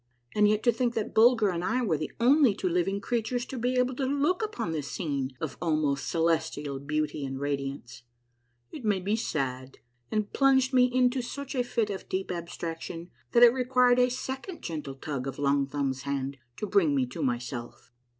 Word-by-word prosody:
And 210 0 +4
yet 215 +1 +1
to 240 - +5
think 240 +1 -1
that 220 - -2
Bulger 225 -2 +5
and 175 -1 -2
I 250 +6 0
were 185 -9 +1
the 155 - -4
only 255 -2 +5
two 190 - -2
living 180 +3 0
creatures 240 +2 -1
to 265 - -7
be 250 +1 0
able 250 +1 +2
to 270 - 0
look 285 +8 +1
upon 425 - -3
this 150 -4 -3
scene 140 -4 -2
of - - -5
almost 155 -5 0
celestial 160 -4 0
beauty 150 +1 -2
and 135 -1 -4
radiance! 140 -3 -4 0.7
It 290 - -8
made 205 -4 +1
me 205 +2 +2
sad, 130 - -3 0.3
and 215 -1 -2
plunged 265 -1 +3
me 250 -1 +6
into 255 +1 +2
such 275 +3 -6
a 250 -2 +1
fit 230 -3 -1
of 195 - -7
deep 190 0 -2
abstraction 170 0 -6 0.2
that 240 - +7
it 240 -1 +9
required 250 -1 +3
a 250 0 +4
second 265 +7 -5
gentle 150 -4 -5
tug 135 -1 -4
of 135 - -5
Long 140 -1 +2
Thumbs' 135 -2 -2
hand 140 0 -3 0.2
to - - -3
bring 185 -8 +3
me 130 -2 +2
to 125 +6 -7
myself. 120 -2 -4
185 Hz, 190 wpm, -28 LUFS, -, 0.7 s, it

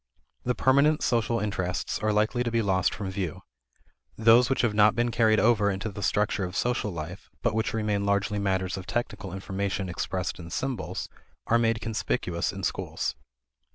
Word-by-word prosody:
The 125 0 +1
permanent 140 +4 +3
social 115 -1 +1
interests 95 -3 -2
are 110 0 +1
likely 110 +4 +1
to 120 - -1
be 115 -1 +1
lost 95 -3 +2
from 95 -3 -4
view. 95 -4 -4 0.8
Those 115 +3 +6
which 135 - +2
have 115 -3 +2
not 105 0 +5
been 120 0 +1
carried 110 -2 +4
over 110 -3 +4
into 95 +3 -2
the 100 0 -7
structure 105 +1 +1
of 90 +1 -4
social 120 -2 0
life, 85 +2 -7
but - - +2
which 110 0 0
remain 105 -2 0
largely 100 +1 +1
matters 95 -1 0
of 95 -1 -8
technical 100 -5 -3
information 95 0 -3
expressed 90 -1 -3
in 85 -1 -8
symbols, 130 +2 -3 0.4
are 115 - +3
made 115 -1 +1
conspicuous 105 -5 -1
in 95 -1 -7
schools. - - -2
105 Hz, 175 wpm, -27 LUFS, 95-115 Hz, 0.8 s, Those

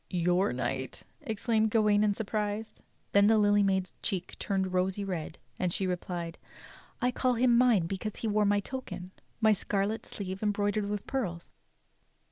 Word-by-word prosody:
"Your 180 +2 +2
knight!" 130 +1 -3 0.2
exclaimed 220 0 +1
Gawain 210 -1 +3
in 205 -1 +2
surprise. 215 0 -3 0.3
Then 200 0 +5
the 220 0 +5
Lily 205 -1 +4
Maid's 190 -2 +1
cheeks 185 -2 -3
turned 190 -2 -1
rosy 185 +2 +1
red, 175 -4 -4 0.2
and 180 -1 0
she 190 - -1
re 180 -1 +1
plied: 170 -2 -6 0.6
"I 250 -1 +2
call 255 0 +1
him 240 0 +4
mine 235 -7 +4
because 195 +4 -4
he 225 - -3
wore 210 0 +2
my 205 0 +3
token 200 -7 -6 0.2
— - - -39
my 220 -1 +6
scarlet 205 +2 -1
sleeve 190 -1 -5
embroidered 205 0 0
with 205 -1 -3
pearls." 180 -11 -3
205 Hz, 165 wpm, -30 LUFS, 185-215 Hz, 0.6 s, my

